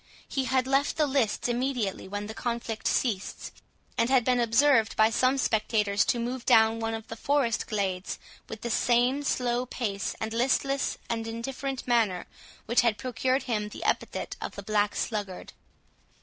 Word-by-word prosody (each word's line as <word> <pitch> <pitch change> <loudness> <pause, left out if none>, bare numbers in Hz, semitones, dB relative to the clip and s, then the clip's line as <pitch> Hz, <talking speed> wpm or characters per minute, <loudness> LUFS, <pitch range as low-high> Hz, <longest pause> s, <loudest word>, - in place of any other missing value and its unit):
He 270 -1 -1
had 255 +1 +2
left 275 +2 +1
the 305 - +4
lists 265 -7 0
immediately 240 -6 -1
when 205 +1 -4
the 220 - -6
conflict 235 -1 -3
ceased, 210 -7 -1 0.5
and 230 - +3
had 260 -3 +4
been 250 -1 +3
observed 235 0 +4
by 220 +1 +4
some 255 +4 +2
spectators 210 -4 +2
to - - +1
move 245 +1 -3
down 225 0 +5
one 225 0 -2
of 225 0 -8
the 225 - -6
forest 265 -1 0
glades 190 -3 -2 0.3
with 220 -1 -7
the 235 - -3
same 245 +5 +2
slow 250 -2 0
pace 200 -6 -3
and 220 0 -3
listless 270 +3 +1
and 225 -1 -2
indifferent 260 +3 -4
manner 225 -7 +1 0.4
which 235 +2 +3
had 230 -3 +2
procured 255 +2 0
him 210 -4 -2
the - - -8
epithet - - -1
of - - -5
the 200 - -7
Black 210 0 +1
Sluggard. 205 -5 -4
235 Hz, 165 wpm, -28 LUFS, 215-255 Hz, 0.5 s, down